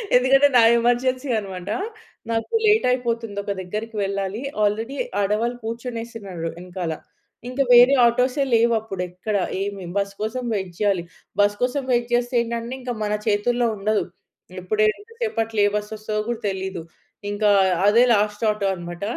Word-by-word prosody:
ఎందుకంటే, 270 Hz, +3 st, +5 dB
నా 240 Hz, -, +7 dB, 0.2 s
ఎమర్జెన్సీ 255 Hz, +3 st, +1 dB
అన్నమాట. 190 Hz, -2 st, -7 dB, 0.6 s
నాకు 225 Hz, -, -2 dB
లేట్ 430 Hz, +1 st, +4 dB
అయిపోతుంది 230 Hz, -4 st, -2 dB
ఒక 200 Hz, -, -3 dB
దగ్గరికి 215 Hz, +5 st, -5 dB
వెళ్ళాలి. 195 Hz, +2 st, -3 dB, 0.2 s
ఆల్రెడీ 220 Hz, +6 st, 0 dB, 0.3 s
ఆడవాళ్ళు 220 Hz, +5 st, 0 dB
కూర్చొనేసినారు 225 Hz, -6 st, -5 dB
వెనకాల. 180 Hz, -2 st, -4 dB, 0.6 s
ఇంక 265 Hz, +2 st, -1 dB
వేరే 245 Hz, +3 st, +8 dB
ఆటోసే 250 Hz, +4 st, +2 dB
లేవు 230 Hz, +1 st, +4 dB
అప్పుడు 195 Hz, -4 st, -6 dB
ఎక్కడ. 185 Hz, +4 st, -4 dB, 0.3 s
ఏమి 200 Hz, -1 st, -4 dB
బస్ 200 Hz, 0 st, -1 dB
కోసం 230 Hz, +4 st, -2 dB
వెయిట్ 190 Hz, -4 st, -3 dB
జేయాలి. 200 Hz, -4 st, +1 dB, 0.4 s
బస్ 205 Hz, 0 st, +3 dB
కోసం 255 Hz, +3 st, 0 dB
వెయిట్ 240 Hz, -1 st, +1 dB
జేస్తే 245 Hz, +1 st, +1 dB
ఏంటంటే, 235 Hz, +1 st, -4 dB
ఇంక 250 Hz, -1 st, -4 dB
మన 210 Hz, 0 st, -1 dB
చేతుల్లో 235 Hz, +3 st, +2 dB
ఉండదు. 210 Hz, +2 st, +1 dB, 0.6 s
ఇప్పుడు 210 Hz, +4 st, -1 dB
ఎంత 410 Hz, -, -6 dB
సేపు 440 Hz, -, -1 dB
అట్లా 220 Hz, -2 st, -1 dB
ఏ -, -, +2 dB
బస్ 210 Hz, 0 st, -6 dB
వస్తదో 215 Hz, 0 st, -3 dB
కూడా 240 Hz, -1 st, -3 dB
తెలీదు. 190 Hz, -3 st, -4 dB, 0.5 s
ఇంక 205 Hz, +1 st, -4 dB, 0.4 s
అదే 230 Hz, +4 st, +6 dB
లాస్ట్ 210 Hz, +1 st, 0 dB
ఆటో 210 Hz, -2 st, -2 dB
అన్నమాట. 175 Hz, +1 st, -8 dB
220 Hz, 150 wpm, -22 LUFS, 200-240 Hz, 0.6 s, వేరే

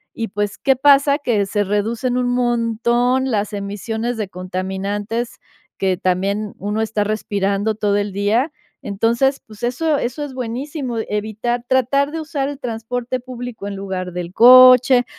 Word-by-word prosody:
y, 225 Hz, -, -3 dB
pues, 205 Hz, +1 st, -3 dB
¿qué 270 Hz, -, +3 dB
pasa? 280 Hz, +1 st, +4 dB
Que 230 Hz, -8 st, 0 dB
se 205 Hz, +1 st, 0 dB
reducen 225 Hz, +5 st, -1 dB
un 250 Hz, -1 st, 0 dB
montón 240 Hz, +2 st, +1 dB
las 210 Hz, -1 st, -1 dB
emisiones 220 Hz, +4 st, -3 dB
de 215 Hz, -2 st, -3 dB
contaminantes 195 Hz, +5 st, -4 dB, 0.4 s
que 190 Hz, -2 st, 0 dB
también 195 Hz, +3 st, -1 dB
uno 210 Hz, +2 st, -2 dB
está 220 Hz, -1 st, 0 dB
respirando 205 Hz, 0 st, -1 dB
todo 205 Hz, -1 st, +1 dB
el 205 Hz, -1 st, -1 dB
día. 215 Hz, -, +1 dB, 0.3 s
Entonces, 235 Hz, +7 st, +1 dB
pues, 215 Hz, +1 st, -14 dB
eso 290 Hz, +5 st, 0 dB
eso 260 Hz, +5 st, -3 dB
es 275 Hz, -, -9 dB
buenísimo, 255 Hz, +1 st, -4 dB
evitar 220 Hz, +3 st, -2 dB
tratar, 275 Hz, +3 st, +2 dB
de 325 Hz, -, -4 dB
usar 285 Hz, -3 st, -3 dB
el 285 Hz, -1 st, -7 dB
transporte 245 Hz, +1 st, -3 dB
público 245 Hz, -4 st, -7 dB
en 200 Hz, -, -5 dB
lugar 185 Hz, -2 st, -4 dB
del 180 Hz, 0 st, -5 dB
coche, 255 Hz, +1 st, +8 dB
225 Hz, 150 wpm, -19 LUFS, 205-255 Hz, 0.4 s, coche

